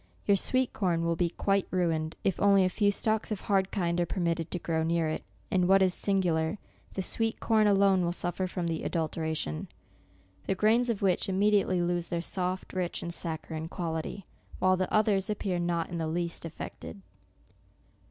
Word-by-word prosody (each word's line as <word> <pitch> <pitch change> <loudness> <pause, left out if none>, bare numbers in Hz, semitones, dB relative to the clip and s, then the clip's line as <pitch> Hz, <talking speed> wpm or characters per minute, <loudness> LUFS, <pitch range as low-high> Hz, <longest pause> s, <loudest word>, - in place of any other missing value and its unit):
Your 200 - +5
sweet 255 +6 +1
corn 170 -4 0
will 170 0 +1
be 170 0 +1
quite 195 +3 0
ruined, 165 -3 0
if 195 - 0
only 200 -1 +5
a - - +2
few 205 +2 +2
stalks 215 +2 0
of 215 - -1
the - - -15
hard 195 -2 +2
kind 175 -3 0
are - - +2
permitted 170 -2 -1
to - - -2
grow 165 -2 -1
near 165 0 +1
it, 155 - -3 0.3
and 180 -1 +3
what 195 0 +6
is 185 -1 +3
singular, 180 -3 +1 0.4
the 190 - -2
sweet 225 +4 -1
corn 220 -2 +3
alone 195 -2 +4
will 170 - +1
suffer 175 +1 -2
from 180 -1 -3
the 165 -1 -2
adulteration, 160 - -2 0.8
the 195 - +1
grains 225 +5 +3
of 215 -4 -1
which 190 0 +2
immediately 195 -2 +2
lose 175 0 -1
their 170 - -2
soft, 185 +2 -3
rich 180 -2 -2
and 170 - -4
saccharine 160 -1 -4
quality, 165 +2 -4 0.3
while 185 0 +3
the 185 0 -2
other 215 -2 +3
appears 195 -4 -1
not 170 -1 -1
in 170 - -3
the 160 - -1
least 170 +1 -2
affected. 175 +4 -8
180 Hz, 185 wpm, -29 LUFS, 170-195 Hz, 0.8 s, what